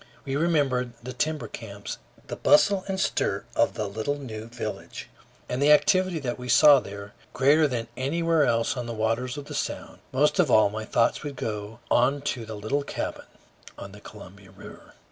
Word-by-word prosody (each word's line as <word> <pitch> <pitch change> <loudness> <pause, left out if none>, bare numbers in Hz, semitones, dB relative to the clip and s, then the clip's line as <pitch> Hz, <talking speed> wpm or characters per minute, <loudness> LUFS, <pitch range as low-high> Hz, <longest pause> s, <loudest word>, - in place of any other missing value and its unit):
We 135 -1 -3
remembered 140 -6 +1
the 130 +1 -6
timber 155 +4 -2
camps, 100 -3 -8 0.3
the - - -6
bustle 200 -1 +4
and 190 -1 -2
stir - - 0
of - - +2
the 105 - -2
little 110 +8 -3
new 110 -5 -7
village, 115 - -7 0.4
and 125 +2 -3
the 145 +1 +5
activity 185 +3 +4
that 125 -2 -4
we 125 0 -7
saw 145 0 +7
there, 100 -2 -9 0.2
greater 150 +3 +4
than 120 -4 -3
anywhere 165 +4 +1
else 115 -2 +1
on 125 -2 -4
the 115 - -4
waters 115 +4 -1
of 145 - -7
the - - -9
Sound. - - -4
Most 150 +7 +2
of 170 -6 +4
all, 110 -4 +5
my 110 +1 -5
thoughts 115 +2 +1
would 145 -2 -6
go 110 0 -5
on 135 +4 +3
to 115 -4 -8
the 110 - -6
little 110 +8 -1
cabin 140 - -5 0.5
on 100 - -9
the 105 +1 -13
Columbia 100 -2 -13
River. - - -14
125 Hz, 185 wpm, -26 LUFS, 110-145 Hz, 0.5 s, saw